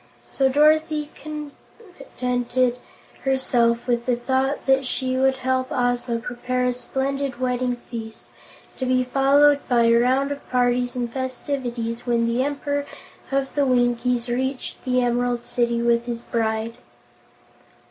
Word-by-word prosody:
So 270 -1 +2
Dorothy 305 +1 +3
contented 255 - -3 0.4
herself 245 -3 +2
with 240 -1 0
the 250 - +3
thought 265 +3 -1
that 270 0 +3
she 255 0 -2
would 265 0 +2
help 260 0 0
Ozma 245 -1 0
prepare 250 +2 -2
a 250 - +1
splendid 270 +1 -3
wedding 250 -1 0
feast, 230 -2 -9 0.5
to 260 - -1
be 255 0 +3
followed 280 +3 +4
by 240 -2 +4
a 230 0 +5
round 260 +4 +3
of 285 - -7
parties 245 0 +1
and 240 -2 -3
festivities 250 -3 -3
when 235 -1 +2
the 235 +2 +1
Emperor 285 0 -2 0.4
of 270 0 -1
the 290 - +2
Winkies 245 -1 +1
reached 260 +2 -3
the 255 -1 +2
Emerald 245 0 0
City 235 -1 0
with 235 0 +2
his 235 -1 -4
bride. 225 0 -2
250 Hz, 135 wpm, -23 LUFS, 240-270 Hz, 0.5 s, a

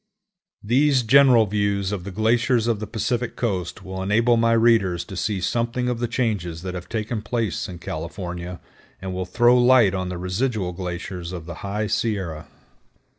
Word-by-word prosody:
These 130 +4 +3
general 125 -1 +6
views 100 -1 -1
of 95 -4 -4
the - - -5
glaciers 115 +4 +2
of 115 -3 0
the 110 - -5
Pacific 120 +1 -2
Coast 95 -8 -3
will 95 0 -6
enable 115 +5 +3
my 115 0 +3
readers 115 -6 +3
to 95 - -9
see 100 +2 -1
something 120 +6 -1
of 120 -2 -2
the 120 - -1
changes 105 -9 -2
that 90 -1 -4
have 90 -1 -7
taken 110 0 -3
place 110 -2 -2
in 90 - -7
California, 85 +2 -6 0.4
and 95 0 -5
will 90 0 -3
throw 120 +6 +4
light 120 -5 +5
on 95 -1 -2
the 90 - -4
residual 95 +2 -1
glaciers 90 -1 -5
of 85 -3 -7
the 85 - -7
High 105 +2 -2
Sierra. 100 -7 -2
105 Hz, 175 wpm, -23 LUFS, 90-115 Hz, 0.4 s, general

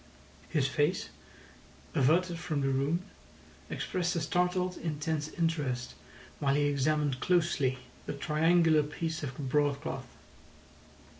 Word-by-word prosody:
His 145 -5 +2
face, 145 +6 0 0.8
averted 165 +4 +3
from 155 -5 -2
the 135 - +1
room, 140 +6 +1 0.7
expressed 180 -1 -1
a - - +1
startled 180 +2 +1
intense 155 -1 -2
interest 150 -8 -1 0.5
while 140 -1 +2
he 145 - +3
examined 145 -1 +1
closely 155 -7 +2 0.3
the - - -2
triangular 155 +2 +3
piece 155 +2 -3
of 130 -3 -5
broad 145 0 +1
cloth. - - -5
150 Hz, 115 wpm, -31 LUFS, 140-170 Hz, 0.8 s, averted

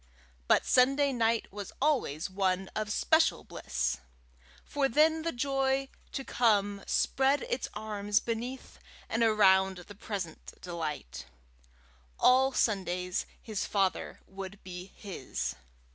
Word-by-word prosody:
But - - +4
Saturday 275 +2 +4
night 230 -3 +1
was 205 -2 -6
always 260 - +1
one 190 -1 0
of 215 -1 -2
special 320 +8 +3
bliss; - - -2 0.7
for 275 -2 0
then 315 +5 +4
the 335 +1 -1
joy 270 0 0 0.2
to 270 - -3
come 205 -6 +1
spread 270 +1 +2
its 255 - -2
arms 210 -1 0
beneath 240 +3 -5 0.3
and 225 - -1
around 190 -4 +4
the 180 +3 -11
present 195 -5 -6
delight: 150 - -5 0.9
all 260 +1 +5
Sunday 180 -6 0 0.3
his 215 -3 -4
father 195 -2 -1
would 195 +1 -9
be 180 0 -7
his. 100 - -4
210 Hz, 115 wpm, -30 LUFS, 190-265 Hz, 0.9 s, all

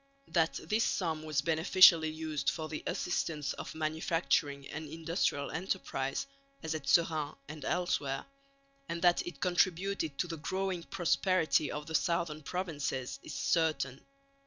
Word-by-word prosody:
That 165 -2 +2
this 220 +2 +2
sum 160 -4 0
was 155 -3 -1
beneficially 165 0 +6
used 155 -1 -2
for 160 -2 -3
the 155 -1 -5
assistance 155 -5 -1
of - - -7
manufacturing 155 -2 0
and 155 0 -6
industrial 160 -2 -1
enterprise, 160 -6 -2 0.4
as 160 0 -2
at 155 -3 -5
Seraing 155 -3 +2
and 150 0 -8
elsewhere, 145 -6 -1 0.6
and 170 - -2
that 175 -1 +5
it 165 -6 -7
contributed 180 -3 +1
to 175 - 0
the 165 -1 -5
growing 185 +3 -2
prosperity 175 -2 +1
of 150 0 -5
the 160 - -7
southern 170 -2 0
provinces, 145 -6 -3
is 140 - -8
certain. 140 -3 0
160 Hz, 135 wpm, -32 LUFS, 150-175 Hz, 0.6 s, beneficially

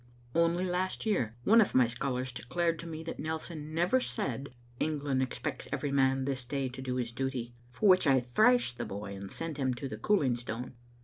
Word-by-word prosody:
Only 170 +2 +2
last 185 +3 -1
year 125 - 0
one 225 - +7
of 205 - +1
my 130 -1 +7
scholars 125 +2 -2
declared 165 +7 -1
to 170 - -6
me 160 -1 -6
that 165 - -6
Nelson 155 0 -4
never 175 +10 +3
said 135 - -3 0.3
"England 145 -3 0
expects 130 - -3
every 145 - -1
man 135 -1 +3
this 135 -2 -2
day 135 +1 -2
to 130 +1 -8
do 130 -1 -2
his 120 -2 -2
duty," 125 -1 -3 0.2
for 205 - 0
which 185 -4 +6
I 135 -1 +6
thrashed 125 - +3
the - - -2
boy 100 0 -6
and 100 0 -7
sent 165 -3 -4
him 130 -3 0
to 135 +3 -4
the 110 - -6
cooling 130 - +2
stone. 120 +1 -5
135 Hz, 200 wpm, -31 LUFS, 125-165 Hz, 0.3 s, one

